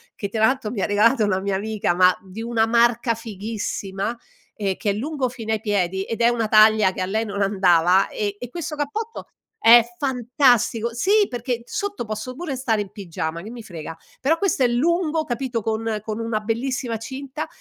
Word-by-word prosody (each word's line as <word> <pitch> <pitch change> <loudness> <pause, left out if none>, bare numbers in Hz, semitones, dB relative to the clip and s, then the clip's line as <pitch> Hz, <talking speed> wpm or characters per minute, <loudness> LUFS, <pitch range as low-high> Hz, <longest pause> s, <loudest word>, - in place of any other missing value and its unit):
che 200 - -4
tra 220 +1 +2
l'altro 260 -3 0
mi 220 -5 -3
ha - - +2
regalato 215 +4 +3
una 190 -2 +1
mia 195 0 -1
amica, 205 -3 -1
ma 180 0 +5
di 190 +3 -9
una 230 -1 +1
marca 235 0 +3
fighissima, 210 -1 -4 0.4
e 195 -3 -2
che 205 - 0
è - - -1
lungo 265 +4 -2
fino 225 -3 -4
ai 220 - 0
piedi, 190 -3 -1
ed 225 +3 -4
è 235 - +6
una 230 -2 0
taglia 215 -2 +6
che - - -5
a - - +1
lei 220 +4 -1
non 200 -1 -4
andava 190 -1 +3
ehm, 205 -1 -2
e 245 - -7
questo 335 -1 -5
cappotto 420 +11 -4 0.4
è 235 +1 +10 0.2
fantastico 245 -3 +2
sì 405 - +3
perché 245 0 -3
sotto 405 +3 -3
posso 220 +4 -5
pure 300 -2 -4
stare 230 -5 0
in 200 -2 -7
pigiama 170 -4 -5
che 205 - -9
mi 235 -1 -9
frega, 165 -4 -8 0.2
però 310 +5 +2
questo 380 -7 +1
è - - +5
lungo, 320 +6 +1
capito, 240 -3 -3
con 220 0 -1
con 215 0 -4
una 225 -1 -2
bellissima 235 +2 -2
cinta. 270 +6 -6
225 Hz, 195 wpm, -22 LUFS, 205-255 Hz, 0.4 s, è